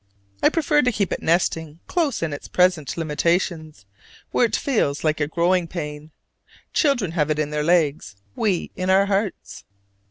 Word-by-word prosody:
I - - +5
prefer 300 -2 +2
to 250 - +2
keep 205 -4 -1
it - - -4
nesting 165 -2 0
close 305 - -1
in 160 -3 -2
its 145 - -7
present 180 -5 +1
limitations, 160 - -1 0.5
where 245 - +3
it 220 - -1
feels 185 - 0
like 155 -1 +1
a 145 - 0
"growing 175 +2 +1
pain"; 150 -3 -6 0.6
children 245 - +1
have 155 -3 0
it 155 - 0
in 150 -1 -1
their 150 0 -1
legs, 155 - +1 0.2
we 195 -6 -1
in 185 0 -2
our 190 +1 +5
hearts. 200 0 -3
170 Hz, 165 wpm, -22 LUFS, 155-200 Hz, 0.6 s, I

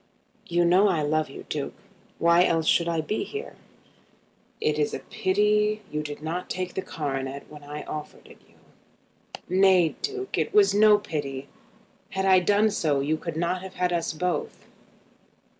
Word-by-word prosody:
"You 175 0 +2
know 185 +4 +5
I 170 -6 +1
love 155 +1 0
you, - - -10
Duke. - - -4 0.4
Why 170 +1 +5
else 165 -2 +1
should 170 +1 +3
I 165 -1 0
be 210 +8 -2
here?" 425 +1 -7 1.0
"It 150 0 0
is 150 - 0
a - - -5
pity 210 +1 +1
you 150 - -2
did 150 0 -7
not 170 +3 -4
take 185 -1 -3
the 190 - -2
coronet 140 -5 -4
when 150 -1 -11
I 150 +1 -7
offered 150 -1 -8
it - - -17
you." - - -25 0.9
"Nay, 185 -2 +4
Duke, 405 -1 -3
it - - -2
was 415 -2 +6
no 210 0 +6
pity. 140 -8 -5 0.6
Had 190 0 -2
I 190 -1 +6
done 205 +4 +3
so, 150 -7 +1
you 145 +3 0
could 160 0 -6
not 175 +2 -1
have 190 0 -9
had 180 -1 0
us 170 -1 -1
both." 180 +3 -3
175 Hz, 170 wpm, -26 LUFS, 155-195 Hz, 1.0 s, was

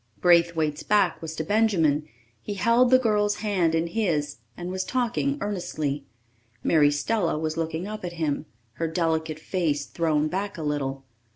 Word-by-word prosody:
Braithwaite's 170 -3 +3
back 205 -5 +2
was 160 -1 -6
to 160 - -2
Benjamin; 165 -7 +2 0.3
he 205 - -5
held 235 +5 +4
the 255 - +7
girl's 210 -4 +1
hand 180 -6 +2
in 165 +1 +1
his 165 -7 -1 0.2
and 175 +1 -5
was 185 0 -2
talking 255 +4 0
earnestly. 155 -8 -3 0.6
Mary 150 -3 +5
Stella 165 +4 0
was 155 0 -2
looking 165 +1 -2
up 215 -1 -6
at 175 -1 -4
him, 155 -2 -2 0.3
her 165 - +1
delicate 160 -1 -1
face 155 -4 -1
thrown 155 -3 0
back 195 +4 -3
a 160 - -5
little. 135 -2 -2
165 Hz, 160 wpm, -25 LUFS, 155-205 Hz, 0.6 s, the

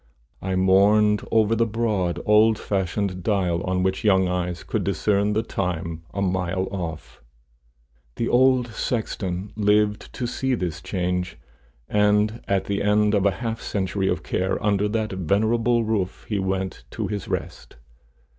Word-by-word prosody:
I 95 0 -2
mourned 100 +3 +4
over 110 0 +3
the 115 +1 +2
broad, 105 -6 -1
old 110 +1 +5
fashioned 95 -1 -2
dial, 90 -4 0
on 95 0 0
which 95 0 -1
young 95 -3 +4
eyes 90 -1 -2
could - - -2
discern 105 0 +1
the 110 +2 +1
time 85 -5 -3
a 100 - -2
mile 95 0 -1
off. 85 -5 -6 0.9
The 115 - -1
old 130 -1 +3
sexton 100 -5 -3
lived 105 0 +1
to 125 - -3
see 130 +2 -1
this 85 -5 -4
change, 90 -1 -2 0.5
and 105 +2 +2
at 100 -1 +1
the 100 0 -1
end 105 +1 +3
of 100 -2 +2
half 110 +3 -1
a - - -11
century 95 -1 -1
of 85 -4 -1
care 95 +1 -1
under 105 0 +2
that 110 -1 -1
venerable 110 +6 +1
roof 105 -4 -2
he 105 -2 -1
went 95 0 -2
to - - -4
his 105 -2 -4
rest. - - -5
100 Hz, 150 wpm, -24 LUFS, 95-110 Hz, 0.9 s, old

